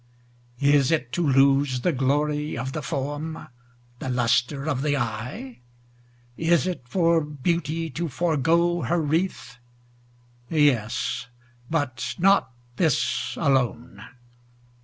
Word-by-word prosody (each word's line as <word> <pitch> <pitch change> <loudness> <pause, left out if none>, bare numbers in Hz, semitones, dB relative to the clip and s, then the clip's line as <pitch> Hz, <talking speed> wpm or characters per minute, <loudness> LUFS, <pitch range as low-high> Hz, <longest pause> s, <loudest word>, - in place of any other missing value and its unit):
Is 140 -1 +4
it 140 -7 0
to 175 - -1
lose 135 -2 +3
the 180 - +2
glory 150 +2 0
of 130 +3 -3
the 155 - -4
form, 150 +2 -4 0.5
The 130 - -4
lustre 125 +3 +1
of 140 -4 -1
the 145 0 +1
eye? 120 +1 -5 0.8
Is 165 -2 +2
it 180 -5 -3
for 165 +1 +2
beauty 165 +2 -2
to 170 0 -3
forego 170 +3 +1
her 175 +1 0
wreath? 165 0 -2 0.9
Yes, 130 -7 +1 0.4
but 145 -6 -2
not 195 -5 +3 0.3
this 60 - 0
alone. 125 -5 0
145 Hz, 110 wpm, -24 LUFS, 130-165 Hz, 0.9 s, Is